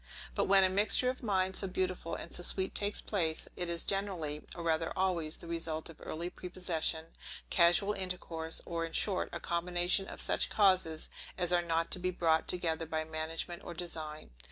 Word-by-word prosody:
But - - +1
when 195 0 +6
a 185 - +6
mixture 210 +6 +4
of 255 - -11
minds 190 -4 +1
so 195 - 0
beautiful 185 -2 -2
and - - -7
so - - +3
sweet 190 +2 -1
takes 205 0 0
place, 165 -6 0
it 175 -1 -1
is 170 0 +1
generally, 180 -7 -1
or 170 - -6
rather 165 0 +1
always 170 -4 0
the - - -7
result 165 -1 -3
of 165 - -16
early 170 +2 -4
prepossession, 175 -3 -1 0.5
casual 175 +4 +4
intercourse, 175 -4 -3
or 170 -1 -2
in 165 0 -5
short, 195 -3 +3
a 170 - -4
combination 175 +3 +1
of - - -8
such - - +3
causes 185 -6 +2 0.3
as 180 -1 +2
are 175 - +4
not 165 -1 -1
to - - +4
be 185 +1 0
brought 165 -3 +2
together 165 -2 -1
by 160 0 -1
management 160 +2 -4
or 175 - -7
design. 160 -3 -6
175 Hz, 185 wpm, -33 LUFS, 165-185 Hz, 0.5 s, when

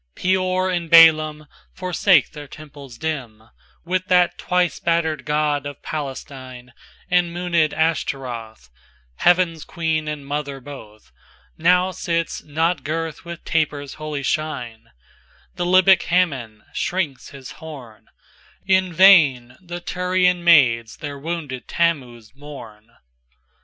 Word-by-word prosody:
XXIIPeor 185 0 0
and 170 -2 -4 0.9
BaälimForsake 185 -3 +2
their 150 -2 -10
temples 140 -4 -12
dim, 130 -9 -5 0.4
With 185 +1 -2
that 180 -2 +3
twice 180 -1 0
battered 160 -4 -1
god 150 -1 0
of 145 -1 -10
Palestine; 130 -4 -7 0.4
And 180 -1 +3
moonèd 170 -3 +1
Ashtaroth, 125 - -3 0.5
Heaven's 175 -3 +2
Queen 160 -2 -2
and 150 -2 -5
Mother 140 -1 -4
both, 110 - -13 0.4
Now 180 +3 +3
sits 165 -1 -3
not 160 0 -1
girt 160 +2 -4
with 170 0 -9
tapers' 145 -4 -1
holy 155 -2 -5
shine:The 120 - -6
Libyc 185 0 +5
Hammon 135 -12 -1
shrinks 170 -8 -3
his 135 -2 -11
horn; 125 -9 -11 0.6
In 190 -1 +2
vain 155 -10 +5
the 175 -1 -7
Tyrian 180 0 0
maids 120 -9 +4
their 145 -2 -7
wounded 150 -5 -5
Thammuz 125 -10 -2
mourn. 125 -7 -12
155 Hz, 110 wpm, -21 LUFS, 135-175 Hz, 0.9 s, Libyc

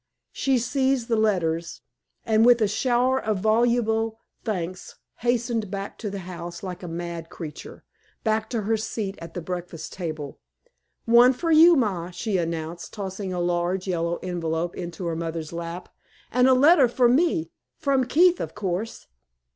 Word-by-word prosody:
She 270 -2 +1
seized 260 0 0
the 230 - +3
letters, 170 -6 0 0.4
and 220 0 +3
with 240 0 +6
a 215 - +3
shower 250 +4 +1
of 215 -2 0
voluble 225 +1 +1 0.3
thanks 185 -4 -4 0.2
hastened 235 -3 0
back 195 0 -6
to 215 - -3
the 200 -1 -5
house 175 -1 -7
like 180 -2 -6
a 180 - -6
mad 170 0 -5
creature 155 -4 -9 0.4
back 220 0 0
to 230 -4 -2
her 220 +2 +1
seat 215 -2 -4
at 165 0 -9
the 175 - -3
breakfast 175 -2 -6
table. 155 -6 -5 0.7
"One 240 +2 +6
for 330 +6 -2
you, 330 +2 +8
ma," 190 - 0
she 190 +3 -2
announced, 165 0 -4
tossing 195 -1 -5
a 180 - -2
large 175 +2 0
yellow 170 -2 0
envelope 170 -1 -2
into 175 +1 -6
her 165 -1 -1
mother's 165 -1 -4
lap, 170 +1 -6 0.4
"and 250 +1 +4
a 260 - +6
letter 285 +1 +6
for 245 +1 +3
me 250 - +2 0.3
from 275 -4 +1
Keith, 350 +7 +4
of - - -5
course." 205 +2 -3
200 Hz, 160 wpm, -25 LUFS, 175-240 Hz, 0.7 s, you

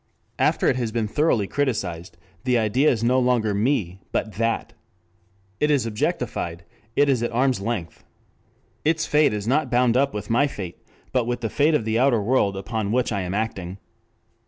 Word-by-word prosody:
After - - +2
it 130 - +3
has 120 -3 -2
been 115 -1 -1
thoroughly 135 -4 +1
criticized, 90 -10 -2 0.3
the 125 -1 +2
idea 115 +7 +3
is 115 -2 0
no 125 +2 +3
longer 120 -4 +2
me 100 -4 0
but 110 -1 -2
that. 115 +2 -1 0.9
It 150 - +2
is 140 -6 +2
objectified, 85 -5 -2 0.3
it 145 - +4
is 130 -4 +2
at 120 - -1
arm's 125 -1 +1
length. 100 -6 -4 0.8
Its 160 +1 +1
fate 150 0 +3
is 105 0 -4
not 140 +2 +1
bound 120 -1 +3
up 140 +2 +3
with 105 -1 -5
my 140 +5 +4
fate, 95 -10 -7 0.3
but 125 -3 +1
with 120 0 -2
the 115 - -2
fate 150 +2 +3
of 115 - 0
the 110 +1 +1
outer 130 -3 +4
world 100 -3 +1
upon 105 +1 -3
which 125 +1 +1
I 100 -2 -1
am 90 +1 -3
acting. 95 -4 -3
115 Hz, 180 wpm, -23 LUFS, 105-130 Hz, 0.9 s, it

